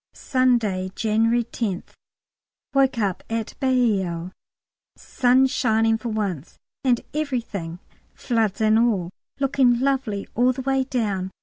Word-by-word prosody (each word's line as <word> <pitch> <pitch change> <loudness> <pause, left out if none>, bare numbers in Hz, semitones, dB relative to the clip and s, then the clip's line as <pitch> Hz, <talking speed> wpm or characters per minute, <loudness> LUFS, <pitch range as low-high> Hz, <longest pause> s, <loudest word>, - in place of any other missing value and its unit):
Sunday, 230 -8 +1
January 225 +2 +2
10th. 220 -5 -4 0.8
Woke 270 -2 +3
up 200 -5 -1
at 225 -1 -3
Bailleul, 195 -10 +1 0.6
sun 255 +1 +2
shining 225 -3 +1
for 235 - -4
once, 195 -9 -3 0.3
and 250 -3 +2
everything 235 - -3 0.4
floods 225 -5 -1
and 220 0 +4
all 200 -7 +1 0.3
looking 260 -3 +3
lovely 255 -7 -1
all 250 +2 +3
the 260 +1 -6
way 270 0 +1
down. 205 -8 -2
230 Hz, 115 wpm, -23 LUFS, 200-255 Hz, 0.8 s, and